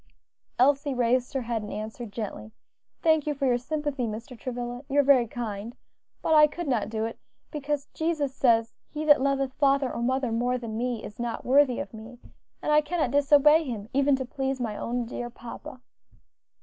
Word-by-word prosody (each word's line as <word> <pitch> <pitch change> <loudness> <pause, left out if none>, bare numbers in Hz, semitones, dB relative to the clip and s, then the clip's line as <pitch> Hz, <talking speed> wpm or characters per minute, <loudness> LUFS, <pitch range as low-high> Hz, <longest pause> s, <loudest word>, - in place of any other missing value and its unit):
Elsie 280 +2 +3
raised 250 +1 +1
her 265 - 0
head, 230 -1 -2
and 210 - -7
answered 215 +1 -6
gently, 215 +1 -6 0.5
"Thank 315 -2 +3
you 295 - 0
for 275 0 -1
your 245 -2 +2
sympathy, 290 -2 -2
Mr. 230 +4 -7
Travilla, 245 0 -5
you 280 +1 +2
are - - +6
very 265 -4 +5
kind; 220 -1 -5 0.5
but 320 - +2
I 300 -1 +8
could 340 +2 -6
not 225 -6 0
do 220 0 -2
it, 230 - -6 0.3
because 295 -1 -2
Jesus 315 -4 -1
says, 230 -4 +2 0.2
'He 305 +1 -4
that 295 -3 +6
loveth 275 -1 0
father 275 -2 +2
or 235 - -4
mother 260 0 0
more 245 +2 0
than 230 -3 -6
me, 240 -1 -2
is 210 - -10
not 235 -1 -4
worthy 265 -1 +4
of - - -6
me;' 225 +3 -10 0.5
and - - 0
I 300 0 +6
cannot 305 -4 -1
disobey 290 +2 +5
Him, 225 -6 -6
even 280 +1 +3
to 260 0 -4
please 270 +1 -3
my 225 -4 -3
own 240 +3 -2
dear 240 +1 -5
papa." 240 +2 -10
255 Hz, 190 wpm, -27 LUFS, 235-285 Hz, 0.5 s, I